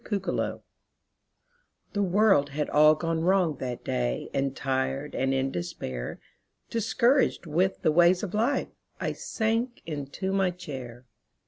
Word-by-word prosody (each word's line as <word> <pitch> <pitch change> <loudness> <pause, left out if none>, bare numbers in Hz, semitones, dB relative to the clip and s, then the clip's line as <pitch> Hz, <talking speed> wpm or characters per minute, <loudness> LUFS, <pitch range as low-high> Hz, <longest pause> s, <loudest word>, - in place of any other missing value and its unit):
MY 205 - +1
COMFORTER 195 - -2 1.3
The 205 - 0
world 195 -6 +4
had 150 +1 -3
all 155 +1 +6
gone 165 +1 -1
wrong 175 -4 +2
that 125 -2 -5
day - - -2
And 135 0 0
tired 135 +1 -2
and 135 0 0
in 135 0 0
despair, 65 - -5 0.5
Discouraged 235 +2 +2
with 175 +5 0
the 155 - +4
ways 175 +3 +4
of 200 - -4
life, 235 +7 +1 0.3
I - - -1
sank 230 +2 -2
into 150 +5 -4
my 195 -1 +2
chair. 130 -8 -8
160 Hz, 135 wpm, -27 LUFS, 135-195 Hz, 1.3 s, all